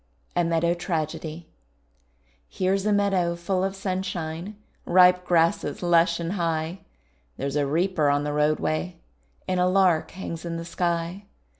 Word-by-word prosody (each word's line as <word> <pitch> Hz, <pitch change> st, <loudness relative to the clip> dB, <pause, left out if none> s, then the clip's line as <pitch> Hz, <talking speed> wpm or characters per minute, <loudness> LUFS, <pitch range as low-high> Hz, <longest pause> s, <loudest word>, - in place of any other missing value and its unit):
A 175 Hz, -, +3 dB
MEADOW 170 Hz, 0 st, +1 dB
TRAGEDY 165 Hz, -1 st, -4 dB, 1.0 s
Here's 195 Hz, +2 st, 0 dB
a -, -, +3 dB
meadow 195 Hz, -4 st, +2 dB
full 185 Hz, +2 st, -1 dB
of 195 Hz, 0 st, -1 dB
sunshine 185 Hz, -1 st, -4 dB, 0.3 s
Ripe 180 Hz, 0 st, +5 dB
grasses 165 Hz, -2 st, +1 dB
lush 170 Hz, -1 st, +3 dB
and 170 Hz, 0 st, -3 dB
high; 165 Hz, -1 st, -2 dB, 0.6 s
There's 140 Hz, +1 st, -3 dB
a 145 Hz, -1 st, +1 dB
reaper 165 Hz, 0 st, +1 dB
on 145 Hz, 0 st, +2 dB
the 145 Hz, 0 st, -2 dB
roadway, 90 Hz, -, 0 dB, 0.5 s
And 185 Hz, -1 st, 0 dB
a 180 Hz, -, +3 dB
lark 185 Hz, -3 st, +3 dB
hangs 170 Hz, -3 st, -7 dB
in 170 Hz, -1 st, -4 dB
the 165 Hz, -, -6 dB
sky. 170 Hz, +2 st, -2 dB
170 Hz, 140 wpm, -25 LUFS, 160-185 Hz, 1.0 s, Ripe